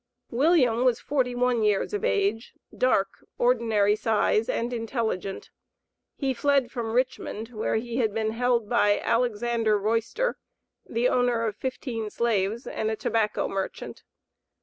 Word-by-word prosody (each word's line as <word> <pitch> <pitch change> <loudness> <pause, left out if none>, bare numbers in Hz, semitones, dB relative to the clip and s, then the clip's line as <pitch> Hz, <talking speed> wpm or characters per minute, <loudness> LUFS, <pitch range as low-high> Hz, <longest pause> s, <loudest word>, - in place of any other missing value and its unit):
William 255 -3 +3
was 250 -2 +3
forty 255 -4 -1
one 245 -1 +1
years 210 - +1
of 415 - -2
age, 395 - 0 0.2
dark, 195 -6 +1
ordinary 225 -4 +2
size, 220 0 +1
and 240 +2 -1
intelligent. 225 -5 -3 0.7
He 270 -2 0
fled 275 -1 +1
from 225 -2 -3
Richmond, 245 -3 -2
where 220 -3 -2
he 235 +1 -2
had 225 -4 +1
been 220 +1 -1
held 235 -1 +1
by 205 -3 +3
Alexander 230 -1 +1
Royster, 230 - -1 0.5
the 235 +2 +1
owner 245 -2 +1
of 215 -3 -2
fifteen 240 -4 -4
slaves, 225 0 0
and 220 - -2
a 220 - -1
tobacco 215 -1 0
merchant. 195 -1 -5
230 Hz, 135 wpm, -26 LUFS, 220-250 Hz, 0.7 s, William